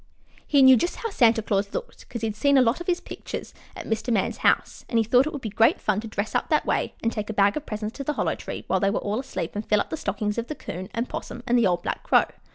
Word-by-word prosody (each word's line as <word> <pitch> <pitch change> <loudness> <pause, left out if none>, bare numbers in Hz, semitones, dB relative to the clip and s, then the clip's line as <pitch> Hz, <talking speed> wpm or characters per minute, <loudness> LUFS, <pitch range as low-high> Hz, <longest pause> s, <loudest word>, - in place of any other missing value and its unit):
He 280 -2 +5
knew 260 -1 +8
just 345 +10 -1
how 455 - -4
Santa 230 - +4
Claus 200 -1 -1
looked, - - -7
'cause 235 -2 -6
he'd 220 -2 -1
seen 280 +5 +3
lots 255 +3 +3
of 345 - -7
his 355 -1 +1
pictures - - -7 0.2
at - - -7
Mr. 225 +2 -2
Man's 205 -5 0
house, - - +1
and 235 - +1
he 225 - +4
thought 245 +5 +4
it - - -3
would 285 -4 -7
be 220 - -4
great 225 +2 +3
fun 210 -2 0
to 225 - -7
dress 215 0 -3
up - - 0
that - - +2
way - - -1
and 230 - +1
take 210 -2 -4
a - - -2
bag 200 0 +4
of 305 - -5
presents 215 +1 -5
to 275 - -4
the 300 - -1
Hollow - - 0
Tree - - -7
while - - +1
they 195 - +2
were 200 - 0
all 210 +3 -2
asleep 260 -10 -4
and 210 - -2
fill 210 -1 +2
up - - -3
the 320 - -2
stockings 210 -1 -2
of 235 - -4
the 305 - -5
'Coon 185 -6 -7
and 230 +2 -1
'Possum 240 - -6
and 240 - +2
the 235 -4 +4
old 175 -1 0
black - - -3
Crow. - - +4
225 Hz, 290 wpm, -25 LUFS, 210-260 Hz, 0.2 s, knew